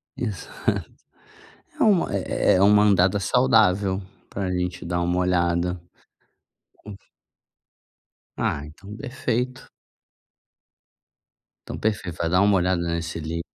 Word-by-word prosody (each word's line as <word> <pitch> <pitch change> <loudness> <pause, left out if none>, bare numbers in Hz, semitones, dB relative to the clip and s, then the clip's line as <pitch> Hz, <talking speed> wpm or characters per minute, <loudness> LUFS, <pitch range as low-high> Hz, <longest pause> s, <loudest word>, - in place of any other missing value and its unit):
Exato. 105 -9 -3 0.9
É - - 0
uma 200 -5 +3
é - - +1
é 90 - +3
uma 105 +1 +6
andada 95 -1 +3
saudável 100 -4 +3 0.3
pra 95 -2 -3
gente 90 -1 -3
dar 85 0 -2
uma 90 +1 0
olhada. 90 -1 0 1.0
Con 105 -2 -11 1.4
Ah, 70 - -2
então 95 +7 -12
perfeito. 125 -1 -3 2.0
Então - - -6
perfeito. 95 -6 -2
Vai 85 - -1
dar 90 +2 +3
uma 100 0 +4
olhada 90 -1 +1
nesse 85 -1 -3
Lidl, 80 +2 -4
90 Hz, 110 wpm, -24 LUFS, 85-105 Hz, 2.0 s, uma